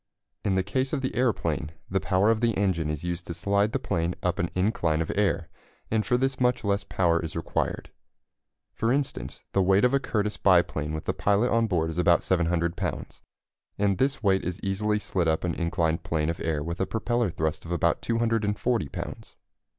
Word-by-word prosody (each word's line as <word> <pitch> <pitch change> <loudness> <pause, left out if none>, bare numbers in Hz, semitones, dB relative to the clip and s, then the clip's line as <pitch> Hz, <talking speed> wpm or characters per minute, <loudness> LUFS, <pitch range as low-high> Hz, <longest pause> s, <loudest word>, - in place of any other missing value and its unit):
In 95 - +1
the 95 - +2
case 130 +7 -1
of 145 - 0
the 130 - -2
aeroplane, 115 - 0
the 95 - 0
power 95 +4 +3
of 110 0 0
the 115 -2 +1
engine 90 -6 +1
is 75 0 -3
used 85 0 -4
to 85 - -4
slide 100 +4 +1
the - - +1
plane 85 -2 -1
up 90 0 0
an 85 - 0
incline 90 -5 +1
of 80 - -1
air, 100 -4 +1 0.4
and 110 -1 +2
for 120 +4 +2
this 135 +1 0
much 125 -2 +2
less 100 -1 0
power 85 -4 +1
is 80 - -5
required. 80 - -2 0.8
For 115 - 0
instance, 140 +1 -2
the 95 - +2
weight 95 +4 +4
of 125 - +2
a 140 - +4
Curtiss 105 -5 -1
biplane 85 -6 +2
with 80 - -5
the - - 0
pilot 100 +4 +2
on 115 0 +3
board 80 -5 0
is 80 - -4
about 85 -1 +4
700 85 -1 +1
pounds, - - -4 0.6
and 100 -2 +1
this 135 -2 +1
weight 95 -2 +3
is 90 +3 -3
easily 105 +2 0
slid 95 -4 -1
up 80 0 +1
an 90 -2 0
inclined 85 -1 0
plane 80 0 0
of 85 - -7
air 75 -3 -1
with 85 +3 -4
a 95 - +1
propeller 120 0 0
thrust 80 -2 -2
of 85 - -8
about 85 -1 +1
240 115 - 0
pounds. - - -7
95 Hz, 205 wpm, -27 LUFS, 85-110 Hz, 0.8 s, weight